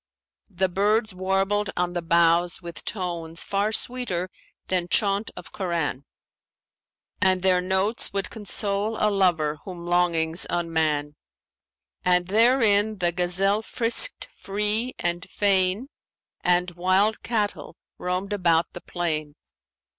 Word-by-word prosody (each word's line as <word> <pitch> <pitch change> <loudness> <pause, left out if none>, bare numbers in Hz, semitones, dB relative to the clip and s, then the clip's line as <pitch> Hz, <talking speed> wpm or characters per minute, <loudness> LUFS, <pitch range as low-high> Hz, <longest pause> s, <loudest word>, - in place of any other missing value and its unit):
The 190 -1 0
birds 210 +3 +1
warbled 195 +2 0
on 175 0 0
the 175 - -2
boughs 170 +1 +2
with 170 -2 -9
tones 170 -4 -4
far 200 +2 -1
sweeter 210 -7 -1 0.3
than 180 -2 0
chaunt 200 +3 +1
of - - -10
Koran 165 -8 -3 1.2
and 185 -1 +2
their 185 -1 +3
notes 190 +4 0
would 195 0 -3
console 210 0 -1
a 210 - +2
lover 165 -6 +1
whom 175 -3 -8
longings 170 -2 +1
unman. 155 -4 -1 0.9
And 180 0 +2
therein 220 -1 +4
the 175 -2 +1
gazelle 185 +4 +1
frisked 235 - +1
free 210 +5 0
and 175 +1 -3
fain 195 +3 +2 0.6
and 180 0 +2
wild 185 +5 +1
cattle 215 -4 -3 0.2
roamed 185 +3 -2
about 170 -4 +1
the 175 - -8
plain. 155 -4 -3
185 Hz, 115 wpm, -24 LUFS, 175-205 Hz, 1.2 s, therein